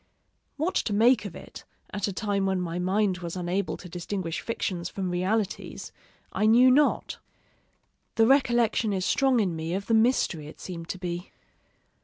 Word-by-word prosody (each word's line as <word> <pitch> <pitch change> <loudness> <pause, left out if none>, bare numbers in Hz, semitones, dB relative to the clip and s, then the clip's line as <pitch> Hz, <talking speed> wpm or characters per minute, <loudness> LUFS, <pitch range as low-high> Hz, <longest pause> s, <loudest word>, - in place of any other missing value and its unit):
_ - - -40 0.5
What 320 +5 -1
to 210 - -1
make 235 +5 +4
of - - -7
it, - - -11 0.3
at 205 -1 -2
a - - -2
time 200 0 -1
when 190 -1 0
my 175 -1 -3
mind 190 +1 +1
was 170 -1 -5
unable 180 +2 -2
to 180 - -11
distinguish 175 0 -4
fictions 180 -6 -3
from 185 -2 -3
realities, 195 +3 -2 0.4
I 215 - +2
knew 245 +3 +6
not. 290 +3 +2 1.0
The 225 - +5
recollection 240 -4 +3
is 185 -1 -1
strong 265 -3 +3
in 185 -6 0
me 160 +2 -3
of 200 +1 -3
the 230 - 0
mystery 220 - +2
it - - -12
seemed 170 -2 -7
to - - -3
be. 175 0 -5
195 Hz, 175 wpm, -27 LUFS, 180-225 Hz, 1.0 s, knew